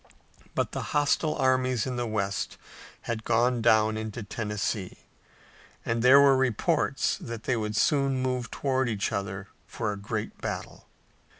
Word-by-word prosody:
But - - 0
the - - -3 0.2
hostile 150 +1 +2
armies 130 -2 +2
in 130 -1 -3
the 120 -1 -2
west 100 -3 -2 0.4
had 115 -1 -4
gone 120 +1 +2
down 110 -1 +4
into 110 +1 -5
Tennessee, 105 -2 -3 0.9
and 115 0 0
there 130 +3 +8
were 140 -1 +6
reports 130 -4 +1
that 115 -1 -7
they 130 - +1
would 105 -1 -2
soon 135 +3 +2
move 125 -2 -1
toward 130 -2 0
each 105 -2 -1
other 100 0 -4 0.2
for 105 - -3
a - - -7
great 105 +2 -5
battle. - - -5
115 Hz, 145 wpm, -27 LUFS, 105-130 Hz, 0.9 s, there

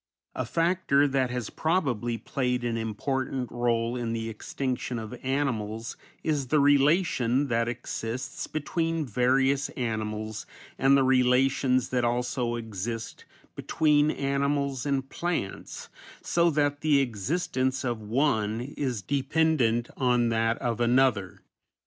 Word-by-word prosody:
A - - -3
factor 165 -4 +2
that 135 -2 +1
has 125 -3 -4
probably 125 - 0
played 125 +2 -2
an 120 -1 -1
important 125 +3 -2
rôle 120 0 0
in 115 -1 -2
the 115 0 -3
extinction 125 +2 -3
of 110 +1 -6
animals 120 -5 -2 0.3
is 145 -4 0
the 155 +4 +3
relation 140 -2 +3
that 115 0 +1
exists 120 +3 -4
between 165 +1 -1
various 130 +4 +2
animals, 110 -3 -3 0.3
and 135 +1 +5
the 135 - +4
relations 130 0 +3
that 125 -1 0
also 120 0 0
exist 115 0 -5 0.3
between 150 -1 +2
animals 140 -2 -1
and 135 -1 0
plants, 165 - -4 0.4
so 170 0 +3
that 145 -1 0
the 150 -3 +4
existence 130 - -1
of 120 -3 -2
one 110 -2 0
is 125 -4 -3
dependent 135 - +1
on 125 -2 +2
that 115 0 +1
of 120 -3 -2
another. 120 -6 +2
125 Hz, 120 wpm, -27 LUFS, 115-140 Hz, 0.4 s, and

